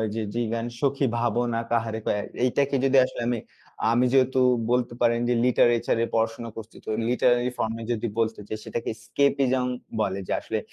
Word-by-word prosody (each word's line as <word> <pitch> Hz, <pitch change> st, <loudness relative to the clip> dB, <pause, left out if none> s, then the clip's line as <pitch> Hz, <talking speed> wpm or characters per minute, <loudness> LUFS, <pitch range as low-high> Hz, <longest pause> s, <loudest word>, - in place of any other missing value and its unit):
যে 115 Hz, -, -1 dB
জীবন 115 Hz, -1 st, -1 dB
সুখী 140 Hz, 0 st, +1 dB
ভাবনা 120 Hz, 0 st, 0 dB
কাহারে 115 Hz, -1 st, 0 dB, 0.5 s
এইটাকে 140 Hz, +2 st, +1 dB
যদি 135 Hz, 0 st, +4 dB
আসলে 125 Hz, -, -6 dB
আমি, 120 Hz, -2 st, 0 dB, 0.5 s
আমি 120 Hz, +2 st, +3 dB
যেহেতু 130 Hz, -1 st, +3 dB, 0.3 s
বলতে 125 Hz, -1 st, +1 dB
পারেন 115 Hz, -1 st, +3 dB
যে, -, -, +3 dB
লিটারেচার 120 Hz, -2 st, +3 dB
এর 115 Hz, -, -2 dB
পড়াশোনা 115 Hz, +1 st, -1 dB
করছি 110 Hz, 0 st, -9 dB
তো -, -, -6 dB, 0.2 s
লিটারেলি 125 Hz, 0 st, +2 dB
ফর্ম 110 Hz, -, -1 dB
এ -, -, -5 dB
যদি 115 Hz, 0 st, -2 dB
বলতে 110 Hz, -1 st, 0 dB
যে -, -, -2 dB
সেটাকে 120 Hz, -, -3 dB
স্কেপিজম 135 Hz, -2 st, +2 dB, 0.3 s
বলে 95 Hz, -2 st, -1 dB
যে -, -, -1 dB
আসলে -, -, -2 dB
120 Hz, 170 wpm, -25 LUFS, 115-125 Hz, 0.5 s, যদি